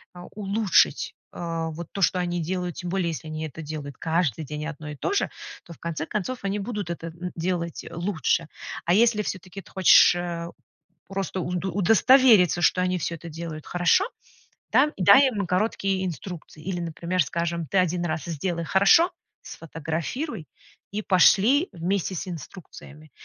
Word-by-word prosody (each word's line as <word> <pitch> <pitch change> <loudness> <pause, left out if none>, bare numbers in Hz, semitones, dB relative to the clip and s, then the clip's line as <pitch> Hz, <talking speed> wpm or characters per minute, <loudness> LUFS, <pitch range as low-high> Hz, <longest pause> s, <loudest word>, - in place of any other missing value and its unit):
э, 175 - -10 0.2
улучшить, 200 -6 +2 0.2
э, 165 -1 -3
вот 170 +1 -7
то, 200 - -4
что 180 - +3
они 175 -1 -1
делают. 180 +1 -3
Тем 180 - -5
более, 180 -2 0
если 160 0 -6
они 155 0 -4
это 160 +3 -9
делают 145 -2 -7
каждый 160 -4 0
день 150 +1 -5
одно 155 -1 -7
и 150 - -6
то 390 - -2
же, 405 - +1 0.4
то, 170 - -10
в - - -17
конце 165 -2 -4
концов, 215 +5 -3
они 200 +1 -1
будут 205 -3 -4
это 165 -1 -6
н 175 +2 -6
делать 170 -1 -3
лучше. 170 -2 -1 0.4
А 170 - +3
если 225 -1 +4
всё-таки 190 +1 -6
ты - - -19
хочешь, 185 -1 +6
э, 170 -1 -4 0.6
просто 195 -1 -3
у 175 - -4
удостовериться, 190 - +4
что 180 - +3
они 180 0 +1
всё 170 - -3
это 165 +1 -10
делают 160 -1 -7
хорошо, 175 - +3 0.7
да,- 290 +4 +5
дай 200 +9 +7
им 205 -7 -2
короткие 190 0 0
инструкции. 165 -1 -7
Или, 180 -1 -3
например, 170 +1 -1
скажем, 170 +2 -2
ты 195 - +1
1 180 -1 +1
раз 155 -2 -3
сделай 170 +1 -3
хорошо, 200 - +5 0.3
сфотографируй 165 - -5 0.5
и 210 - -2
пошли 215 - +4
вместе 185 +2 -2
с 185 - -5
инструкциями. 155 -2 -10
175 Hz, 165 wpm, -25 LUFS, 165-195 Hz, 0.7 s, дай